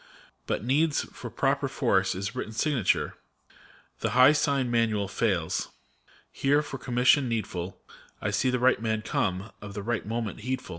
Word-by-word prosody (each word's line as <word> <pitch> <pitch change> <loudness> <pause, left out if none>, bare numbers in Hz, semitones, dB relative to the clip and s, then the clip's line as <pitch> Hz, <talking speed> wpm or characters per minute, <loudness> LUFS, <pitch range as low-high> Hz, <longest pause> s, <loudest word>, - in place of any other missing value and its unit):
But - - -1
needs, 145 +4 +2
for 120 - -9
proper 135 +4 0
force, 95 -8 +1
his 100 +2 -4
written 110 - -4
signature: 130 - +1 0.8
The - - 0
high 130 +2 +8
sign 140 -4 +1
manual 110 -4 +1
fails. 95 -4 -1 0.6
Here, 145 +2 +2
for 135 -2 -7
commission 125 +2 +3
needful, 95 -5 -3 0.4
I 105 - -2
see 105 +6 +1
the 125 - +1
right 125 -1 +3
man 110 -1 -1
come, 95 +2 -1
of 100 -1 -8
the 100 - -4
right 120 +1 -1
moment 115 -1 -3
heedful. 130 +2 -4
115 Hz, 155 wpm, -27 LUFS, 105-130 Hz, 0.8 s, high